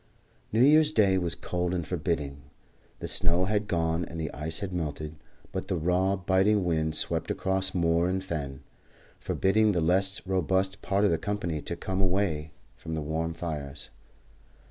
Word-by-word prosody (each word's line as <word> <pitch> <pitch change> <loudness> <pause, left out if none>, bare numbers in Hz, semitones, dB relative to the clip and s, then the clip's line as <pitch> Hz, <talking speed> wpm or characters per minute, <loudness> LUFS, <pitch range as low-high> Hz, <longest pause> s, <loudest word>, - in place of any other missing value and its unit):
New 115 +3 +4
Year's 155 +2 +6
Day 100 -8 +4
was 85 -2 0
cold 90 +1 -2
and 85 -2 -2
forbidding. 75 -4 -2 0.6
The - - -5
snow 85 +2 +2
had 105 +1 0
gone 80 -1 0
and 85 - -7
the 80 -2 -3
ice 75 +4 -3
had 100 -3 -4
melted; 75 -2 -3 0.4
but - - -4
the - - 0
raw, 90 +4 +2
biting 95 +2 +2
wind 80 -2 0
swept - - -1
across 95 0 0
moor 85 0 +2
and 95 +1 -1
fen, 70 -7 -4 0.6
forbidding 105 +2 +2
the 90 - +1
less 95 +4 +1
robust 95 +1 0
part 100 +1 +1
of 100 - +4
the 80 - +1
company 90 -6 -2
to - - -4
come 95 0 -2
away 90 -5 0 0.2
from 80 - -6
the 80 - -2
warm 80 +2 -2
fires. 75 -4 -5
90 Hz, 165 wpm, -28 LUFS, 80-95 Hz, 0.6 s, Year's